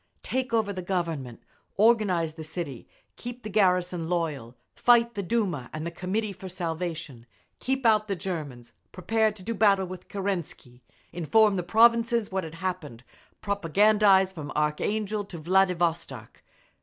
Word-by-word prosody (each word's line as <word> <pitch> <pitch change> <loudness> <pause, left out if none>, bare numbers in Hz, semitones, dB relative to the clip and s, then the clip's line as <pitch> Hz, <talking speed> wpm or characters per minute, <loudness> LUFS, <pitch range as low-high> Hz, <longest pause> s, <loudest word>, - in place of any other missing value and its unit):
Take 260 -1 -2
over 220 -3 +1
the 185 - -5
Government, 165 -10 -3 0.3
organise 200 -7 +3
the 160 0 -8
City, 155 -5 -6 0.3
keep 245 0 -8
the 215 - -6
garrison 180 -4 +1
loyal, 150 -9 -2 0.2
fight 235 -1 +4
the 205 - -3
Duma 185 - -1
and 155 +1 -5
the 170 - -3
Committee 200 +4 -3
for 190 0 -9
Salvation, 165 -7 -5 0.3
keep 265 0 -2
out 215 -1 +4
the 200 - -1
Germans, 145 -10 -6 0.2
prepare 220 +4 +1
to 205 -3 -13
do 230 +4 -2
battle 200 -3 +3
with 185 0 -9
Kerensky, 175 -10 -5 0.3
inform 200 +5 +3
the 180 - 0
provinces 230 +2 +3
what 190 0 -1
had 160 0 -8
happened, 165 -9 -5 0.4
Propagandise 200 0 +3
from 150 -4 -7
Archangel 205 +8 -1
to 180 - -9
Vladivostok…. 170 - 0
185 Hz, 145 wpm, -27 LUFS, 165-215 Hz, 0.4 s, fight